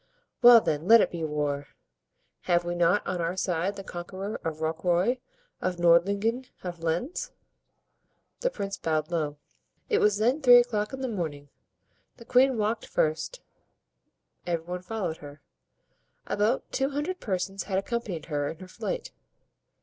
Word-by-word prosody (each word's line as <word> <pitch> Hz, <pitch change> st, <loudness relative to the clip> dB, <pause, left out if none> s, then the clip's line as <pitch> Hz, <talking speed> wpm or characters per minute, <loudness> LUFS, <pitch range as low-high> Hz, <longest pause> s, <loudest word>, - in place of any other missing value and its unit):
"Well, 240 Hz, -1 st, +9 dB
then, 155 Hz, -1 st, -2 dB
let 230 Hz, +1 st, +9 dB
it -, -, +2 dB
be 170 Hz, -2 st, -4 dB
war! 145 Hz, -2 st, -2 dB, 0.8 s
Have 175 Hz, -1 st, +2 dB
we 175 Hz, -, -2 dB
not 175 Hz, +3 st, +2 dB
on 180 Hz, -1 st, -2 dB
our 170 Hz, +2 st, -2 dB
side 185 Hz, +2 st, -1 dB
the 195 Hz, -, -7 dB
conqueror 190 Hz, +3 st, -6 dB
of 160 Hz, -1 st, -3 dB
Rocroy, 175 Hz, +9 st, +1 dB, 0.4 s
of 185 Hz, 0 st, -1 dB
Nordlingen, 200 Hz, +9 st, +3 dB, 0.2 s
of 175 Hz, -2 st, -6 dB
Lens?" 245 Hz, -, -2 dB, 1.1 s
The -, -, +1 dB
prince 200 Hz, -, -5 dB
bowed 155 Hz, 0 st, -1 dB
low. 150 Hz, -3 st, -1 dB, 0.5 s
It 430 Hz, -, +3 dB
was 210 Hz, -1 st, +3 dB
then 245 Hz, +8 st, +2 dB
three 245 Hz, -3 st, +9 dB
o'clock 220 Hz, -4 st, +1 dB
in 265 Hz, -1 st, -6 dB
the 260 Hz, -, -1 dB
morning. 155 Hz, -, -4 dB, 0.7 s
The 235 Hz, -, -13 dB
queen 255 Hz, +1 st, +4 dB
walked 220 Hz, +1 st, -1 dB
first, 160 Hz, -, -1 dB, 1.1 s
every 170 Hz, -2 st, -1 dB
one 180 Hz, +1 st, -5 dB
followed 180 Hz, -4 st, -3 dB
her. 145 Hz, 0 st, -11 dB, 0.9 s
About 210 Hz, +5 st, 0 dB
two 270 Hz, +1 st, 0 dB
hundred 295 Hz, +6 st, -3 dB
persons 195 Hz, -1 st, -3 dB
had 190 Hz, -2 st, -1 dB
accompanied 200 Hz, -4 st, -3 dB
her 145 Hz, -2 st, -2 dB
in 165 Hz, -, -7 dB
her 185 Hz, -, -11 dB
flight. -, -, -5 dB
185 Hz, 150 wpm, -27 LUFS, 165-230 Hz, 1.1 s, Well